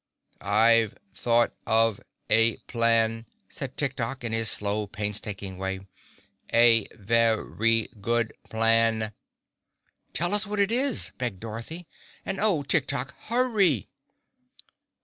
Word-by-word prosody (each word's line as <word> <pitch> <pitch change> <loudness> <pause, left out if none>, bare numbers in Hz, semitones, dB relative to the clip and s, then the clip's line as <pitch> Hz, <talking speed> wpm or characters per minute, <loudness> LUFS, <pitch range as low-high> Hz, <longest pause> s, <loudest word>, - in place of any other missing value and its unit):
"I've 110 +2 +3 0.2
thought 120 0 +1
of 115 -1 +2 0.3
a 115 0 +3
plan," 115 -1 +1 0.2
said - - -6
Tik - - -1
Tok, 135 -2 -4
in 115 - -2
his 115 -1 +3
slow, 105 0 0
painstaking 100 -2 -5
way. 95 0 -3 0.7
"A 115 -2 +5
ve 115 +3 +2
ry 115 +1 0
good 115 +1 0 0.2
plan." 115 -1 +2 1.0
"Tell 175 +3 0
us 210 0 +3
what 210 0 -3
it 200 +1 +2
is," 260 +2 +1
begged 120 -7 -3
Dorothy. 115 - -7 0.4
"And 195 - -3
Oh, 195 -9 +2
Tik 140 0 +2
Tok, 140 +3 -1
hurry!" 215 - +1
115 Hz, 120 wpm, -26 LUFS, 110-140 Hz, 1.0 s, A